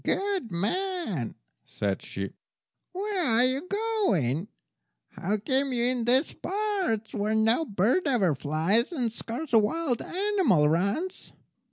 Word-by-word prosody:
"Good 390 - -1
man," 215 - -2 0.3
said 100 -2 -3
she, 100 0 -5 0.6
"where 390 0 -2
are 235 -4 +4
you 270 +7 0
going? 295 - 0 0.6
How 205 +4 -2
came 265 +6 0
you 240 -2 +1
in 245 -1 +1
these 260 +5 +3
parts, 385 - -2
where 210 +1 0
no 225 +8 +3
bird 225 - +1
ever 210 - +2
flies, 160 - +1
and 245 -9 -2
scarce 240 +5 -5
a 225 - +8
wild 245 +3 0
animal 370 - +2
runs?" 200 - -1
240 Hz, 130 wpm, -27 LUFS, -, 0.6 s, a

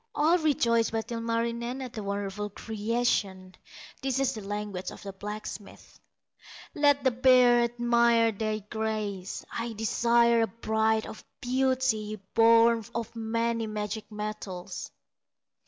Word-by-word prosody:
All 325 +4 +3
rejoice 235 -7 +2
but 225 +1 -4
Ilmarinen 235 +2 -2
At 255 -3 -6
the 215 - -5
wonderful 200 +1 -3
creation; 210 -3 -2 0.5
This 270 0 0
the 215 - -7
language 205 -2 -4
of - - -11
the 195 -1 -7
blacksmith: 210 +1 -8 0.7
"Let 285 -1 +3
the 260 - +4
bears 245 -1 +5
admire 235 -1 +3
thy 215 0 -3
graces; 215 -4 -3
I 230 0 -3
desire 235 +2 +3
a 225 - +2
bride 220 0 0
of - - -9 0.2
beauty 250 -4 0
Born 230 0 +5
of 230 0 -4
many 230 0 -1
magic 215 +1 -5
metals." 210 -4 -6
230 Hz, 120 wpm, -28 LUFS, 210-235 Hz, 0.7 s, bears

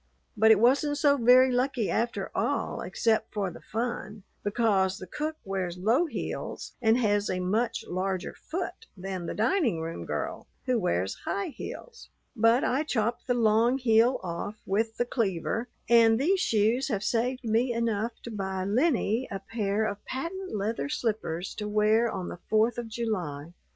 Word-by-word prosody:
But 220 +1 +5
it 220 -2 +7
wasn't 280 +5 +3
so 285 -1 +4
very 255 +1 +6
lucky 250 -3 0
after 235 +1 -1
all - - -1
except 225 -1 0
for 195 -3 -1
the - - -12
fun, 220 -3 -4 0.2
because 200 -3 +1
the - - -8
cook 305 - -3
wears 185 -3 -3
low 230 - +2
heels - - -5
and 225 0 +4
has 205 -4 +1
a 185 - -1
much 215 +6 -1
larger 185 0 -2
foot 370 +6 -6
than 185 -2 -5
the - - -4
dining 230 - +1
room 165 +1 -5
girl, - - -4 0.2
who 255 -3 +2
wears 95 - 0
high 200 - -2
heels. 465 - -9 0.3
But 230 +2 +4
I 265 +4 +1
chopped 240 -6 -1
the 245 - +2
long 230 +2 +3
heel 240 0 +3
off 180 +4 -4
with 220 +3 0
the 240 - +1
cleaver, 225 0 -1 0.2
and 230 -1 +6
these 370 +8 +2
shoes 225 - +2
have 210 -7 -2
saved 250 +4 0
me 230 +2 +1
enough 230 -1 -1
to 235 - -7
buy 190 -3 -3
Lennie 245 - +1
a 195 - -3
pair 205 +1 -1
of 205 -1 -4
patent 340 - -4
leather 215 +7 -2
slippers 215 - -2
to 210 - -3
wear 215 +2 +3
on 185 -4 -4
the - - -7
Fourth 220 +2 +2
of 235 - -5
July." 180 -10 -3
225 Hz, 165 wpm, -28 LUFS, 200-245 Hz, 0.3 s, it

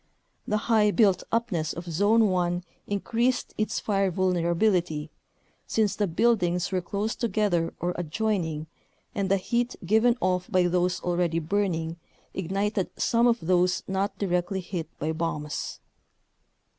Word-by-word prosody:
The 210 - +1
high 220 -3 +4
built 205 -4 +3
upness 190 -9 0
of 170 - -7
Zone 205 +7 +3
1 175 -1 0 0.2
increased 235 +5 0
its 215 - -1
fire 195 -2 +1
vulnerability, 175 -3 +1 0.6
since 215 -3 +1
the 205 - 0
buildings 180 -2 +1
were 185 -1 0
close 205 +5 -2
together 200 -7 0
or 175 +1 -1
adjoining 170 -3 -1 0.5
and 200 -1 -1
the 195 - +4
heat 240 +5 -1
given 220 +5 +4
off 180 +2 0
by 185 -4 +3
those 180 +1 +1
already 175 -2 0
burning 170 -1 -1 0.4
ignited 195 +2 -1
some 235 +1 +3
of 235 -1 +2
those 180 +1 +2
not 195 +1 -1
directly 185 0 -1
hit 170 -3 -5
by 155 +2 -1
bombs. 155 -2 -3
185 Hz, 130 wpm, -27 LUFS, 175-210 Hz, 0.6 s, high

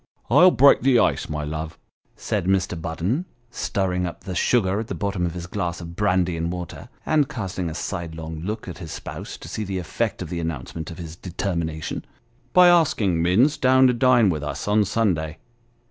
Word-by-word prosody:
" - - -37
I'll 180 +2 +8
break 140 -4 +6
the 130 -1 +4
ice, - - +1
my 75 0 -3
love," 80 +1 -5 0.4
said - - -2
Mr. 95 -3 0
Budden, 90 - -2 0.3
stirring 90 -5 -1
up 85 - -8
the 95 - -5
sugar 100 0 +2
at 110 - -4
the - - -4
bottom 100 -4 -1
of 85 - -6
his 85 -1 -5
glass 90 -1 -3
of 85 -1 -8
brandy 90 -3 +1
and 85 +1 -2
water, 90 +6 -7 0.2
and 150 -3 +2
casting 95 - -4
a 80 - -6
sidelong 80 -3 -5
look 105 +5 -4
at 90 -1 -7
his 80 -4 -7
spouse - - -7
to - - -11
see 110 - -4
the 95 -2 -3
effect 90 -3 -2
of - - -8
the 85 - -2
announcement 80 -1 -5
of 85 - -9
his 80 -2 -8
deter 90 +2 -4
mination, 80 -2 -3 0.3
" 125 +1 -37
by 180 0 +8
asking 115 - +3
Minns 105 - +3
down 130 0 +5
to 125 - +5
dine 120 -4 +4
with 75 -3 -3
us, 75 +4 -4
on 105 0 +3
Sunday." 90 -8 0
90 Hz, 205 wpm, -23 LUFS, 85-110 Hz, 0.4 s, I'll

